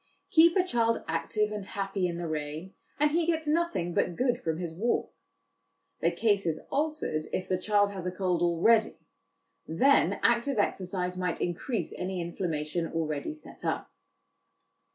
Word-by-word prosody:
Keep 335 Hz, 0 st, +6 dB
a 370 Hz, -, +5 dB
child 230 Hz, -9 st, +1 dB
active 165 Hz, +6 st, 0 dB
and 210 Hz, -1 st, -4 dB
happy 195 Hz, -1 st, -2 dB
in 170 Hz, -1 st, -4 dB
the 170 Hz, -1 st, -3 dB
rain, 155 Hz, +4 st, -4 dB, 0.3 s
and 300 Hz, 0 st, +4 dB
he 335 Hz, +1 st, +1 dB
gets 320 Hz, -2 st, 0 dB
nothing 310 Hz, -, 0 dB
but 175 Hz, -, +1 dB
good 245 Hz, +2 st, +1 dB
from 160 Hz, -1 st, -1 dB
his 170 Hz, -2 st, -4 dB
walk. 230 Hz, +7 st, 0 dB, 0.9 s
The -, -, +3 dB
case 205 Hz, -5 st, +1 dB
is 160 Hz, -1 st, 0 dB
altered 295 Hz, -, -1 dB
if 185 Hz, -, -2 dB
the 185 Hz, -, 0 dB
child 205 Hz, 0 st, +2 dB
has 185 Hz, -3 st, -5 dB
a -, -, -1 dB
cold 180 Hz, -2 st, 0 dB
already; 175 Hz, +6 st, +3 dB, 0.7 s
then 265 Hz, -, +3 dB
active 235 Hz, +2 st, +2 dB
exercise 180 Hz, -2 st, -1 dB
might 180 Hz, -2 st, -1 dB
increase 185 Hz, +7 st, -2 dB
any 185 Hz, 0 st, -3 dB
inflammation 170 Hz, -1 st, -2 dB
already 155 Hz, -, -2 dB
set 310 Hz, -, -13 dB
up. -, -, -2 dB
190 Hz, 155 wpm, -29 LUFS, 170-240 Hz, 0.9 s, Keep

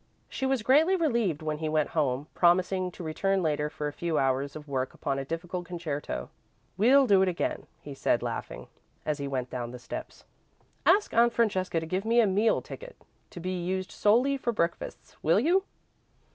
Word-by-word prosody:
She 265 Hz, -, -2 dB
was 265 Hz, -4 st, 0 dB
greatly 305 Hz, -, +5 dB
relieved 235 Hz, -, 0 dB
when 155 Hz, -1 st, -2 dB
he 160 Hz, -1 st, -2 dB
went 155 Hz, -1 st, +1 dB
home, 140 Hz, -3 st, 0 dB
promising 185 Hz, +1 st, +3 dB
to 180 Hz, -, -8 dB
return 190 Hz, +4 st, 0 dB
later 150 Hz, -1 st, 0 dB
for 150 Hz, -1 st, -4 dB
a 145 Hz, -, -5 dB
few 170 Hz, -1 st, -2 dB
hours 135 Hz, +1 st, 0 dB
of 150 Hz, -1 st, -9 dB
work 130 Hz, -2 st, -2 dB
upon 135 Hz, -1 st, -2 dB
a 135 Hz, -, -4 dB
difficult 175 Hz, +3 st, -4 dB
concerto. 150 Hz, -, -4 dB, 0.4 s
"We'll 260 Hz, +8 st, +5 dB
do 200 Hz, -5 st, +5 dB
it 190 Hz, -, +3 dB
again," 175 Hz, -, -3 dB
he 145 Hz, -, -8 dB
said, 135 Hz, -, +1 dB
laughing, -, -, -5 dB, 0.4 s
as 150 Hz, -1 st, -1 dB
he 140 Hz, -, -3 dB
went 130 Hz, -2 st, -3 dB
down 120 Hz, -2 st, -4 dB
the 125 Hz, -, -8 dB
steps. 125 Hz, -, -8 dB, 0.6 s
"Ask 415 Hz, -, +4 dB
Aunt 235 Hz, +1 st, +4 dB
Francesca 190 Hz, -7 st, +1 dB
to 160 Hz, -, -5 dB
give 185 Hz, +4 st, -2 dB
me 230 Hz, +2 st, +3 dB
a 230 Hz, -, +6 dB
meal 205 Hz, +3 st, +2 dB
ticket, -, -, -9 dB, 0.3 s
to -, -, -9 dB
be 180 Hz, +2 st, -3 dB
used 185 Hz, +1 st, -2 dB
solely 250 Hz, +7 st, +3 dB
for 240 Hz, -3 st, -1 dB
breakfasts, 170 Hz, -6 st, -3 dB
will 165 Hz, +5 st, +4 dB
you?" 360 Hz, -, +2 dB
175 Hz, 190 wpm, -28 LUFS, 150-225 Hz, 0.6 s, a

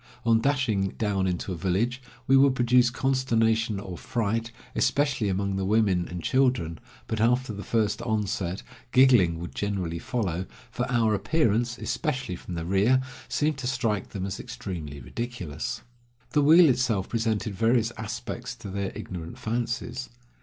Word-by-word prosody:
On 115 Hz, -1 st, +4 dB
dashing 115 Hz, -8 st, +1 dB
down 100 Hz, -3 st, 0 dB
into 90 Hz, +1 st, -2 dB
a -, -, -3 dB
village, 100 Hz, +9 st, 0 dB, 0.2 s
we 135 Hz, -, +4 dB
would 135 Hz, -1 st, +5 dB
produce 125 Hz, 0 st, +4 dB
consternation 115 Hz, -5 st, +1 dB
or 95 Hz, -3 st, -7 dB
fright, 115 Hz, -1 st, -1 dB, 0.2 s
especially 140 Hz, -7 st, +1 dB
among 95 Hz, +1 st, -1 dB
the 95 Hz, -, -1 dB
women 95 Hz, -3 st, +2 dB
and 90 Hz, -1 st, -6 dB
children, 125 Hz, -, +1 dB, 0.3 s
but 110 Hz, -1 st, -2 dB
after 125 Hz, +1 st, +2 dB
the 100 Hz, 0 st, -6 dB
first 110 Hz, -3 st, 0 dB
onset, 105 Hz, -5 st, -2 dB, 0.3 s
giggling 120 Hz, -11 st, +5 dB
would 85 Hz, +1 st, -7 dB
generally 95 Hz, -5 st, -2 dB
follow, 95 Hz, -6 st, -2 dB, 0.2 s
for 125 Hz, +1 st, -2 dB
our 115 Hz, -3 st, +3 dB
appearance, 120 Hz, -1 st, +1 dB
especially 125 Hz, -5 st, -2 dB
from 90 Hz, 0 st, -7 dB
the 85 Hz, -1 st, -4 dB
rear, 100 Hz, +8 st, +3 dB, 0.3 s
seemed 150 Hz, -2 st, 0 dB
to 130 Hz, -, -3 dB
strike 115 Hz, -6 st, -1 dB
them 95 Hz, -2 st, -4 dB
as 95 Hz, 0 st, -4 dB
extremely 75 Hz, +1 st, -6 dB
ridiculous. 110 Hz, -, -5 dB, 0.5 s
The 150 Hz, -, +3 dB
wheel 160 Hz, +4 st, +8 dB
itself 120 Hz, -7 st, +1 dB
presented 110 Hz, -2 st, -1 dB
various 115 Hz, +3 st, +2 dB
aspects 120 Hz, +3 st, -5 dB
to 110 Hz, -4 st, -8 dB
their 100 Hz, 0 st, -2 dB
ignorant 85 Hz, -3 st, -7 dB
fancies. 120 Hz, +2 st, -3 dB
110 Hz, 150 wpm, -27 LUFS, 95-125 Hz, 0.5 s, wheel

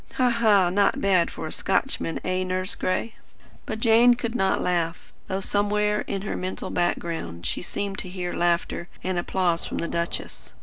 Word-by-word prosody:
Ha, 250 Hz, -1 st, +3 dB
ha! 210 Hz, -6 st, +4 dB
Not 200 Hz, +2 st, +2 dB
bad 185 Hz, -4 st, +3 dB
for -, -, -6 dB
a 155 Hz, -, -5 dB
Scotchman, 190 Hz, -4 st, 0 dB
eh, 185 Hz, 0 st, 0 dB
Nurse 185 Hz, +1 st, 0 dB
Gray?" 200 Hz, +5 st, -1 dB, 0.5 s
But 220 Hz, -, -3 dB
Jane 235 Hz, +2 st, +6 dB
could 235 Hz, -1 st, -3 dB
not 190 Hz, -5 st, +2 dB
laugh; 170 Hz, -2 st, -1 dB
though 190 Hz, +1 st, -2 dB
somewhere 210 Hz, +1 st, +1 dB
in 195 Hz, -1 st, -3 dB
her 205 Hz, -, -3 dB
mental 185 Hz, +1 st, -4 dB
background 165 Hz, -, -2 dB
she -, -, -1 dB
seemed 200 Hz, +2 st, -4 dB
to 185 Hz, -, -3 dB
hear 180 Hz, -1 st, -4 dB
laughter 170 Hz, 0 st, 0 dB, 0.2 s
and 185 Hz, -1 st, 0 dB
applause 175 Hz, -1 st, 0 dB
from -, -, -4 dB
the 170 Hz, -, -2 dB
duchess. 170 Hz, 0 st, -3 dB
185 Hz, 175 wpm, -25 LUFS, 175-210 Hz, 0.5 s, Jane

